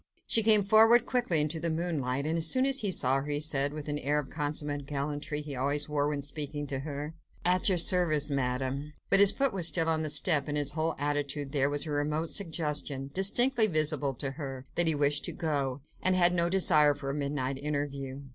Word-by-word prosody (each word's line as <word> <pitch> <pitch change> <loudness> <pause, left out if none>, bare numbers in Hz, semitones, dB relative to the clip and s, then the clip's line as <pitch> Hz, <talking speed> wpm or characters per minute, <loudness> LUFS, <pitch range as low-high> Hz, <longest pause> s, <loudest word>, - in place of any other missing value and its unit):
She 225 - +3
came 215 -2 +5
forward 225 +4 +5
quickly 235 -11 +1
into 155 +2 -2
the 170 +1 -2
moonlight, 150 -5 -2
and, 160 +1 -1
as 165 -1 +2
soon 260 0 +2
as 275 0 +3
he 205 - -2
saw 135 -6 +2
her, 135 +1 -5
he 145 0 -1
said, 145 -2 +1
with 150 0 -8
that 145 -1 -3
air 145 +2 +1
of 145 -3 -4
consummate 145 -2 -4
gallantry 145 +1 -4
he 145 -2 -6
always 145 +3 -1
wore 145 -1 -1
when 145 -1 -4
speaking 145 +1 -4
to 135 -1 -4
her,— 145 +2 -6 0.3
"At 180 +4 +2
your 185 - +1
service, 165 -4 +2
Madame!" 135 +2 -3 0.2
But - - +6
his 200 -1 +7
foot 275 -2 -1
was 180 -4 +2
still 165 -2 +2
on 160 -1 0
the 155 - -2
step, 150 0 +2
and 150 0 -3
in - - +3
his 145 - -1
whole 160 +1 -2
attitude 145 -1 -3
there 140 -1 +1
was 145 +1 -1
a 155 - -6
remote 150 +2 -2
suggestion, 150 -6 -2
distinctly 225 +5 +4
visible 150 -5 +1
to 135 +2 -3
her, 135 -3 -8
that 175 -1 +2
he 160 - +3
wished 145 0 +2
to - - -3
go, 140 -4 -3 0.2
and 185 0 +4
had 175 -1 +4
no 170 -1 0
desire 155 -6 +3
for 140 -1 -5
a - - -5
midnight 140 -2 -3
interview. 140 -2 -4
150 Hz, 220 wpm, -28 LUFS, 140-165 Hz, 0.3 s, his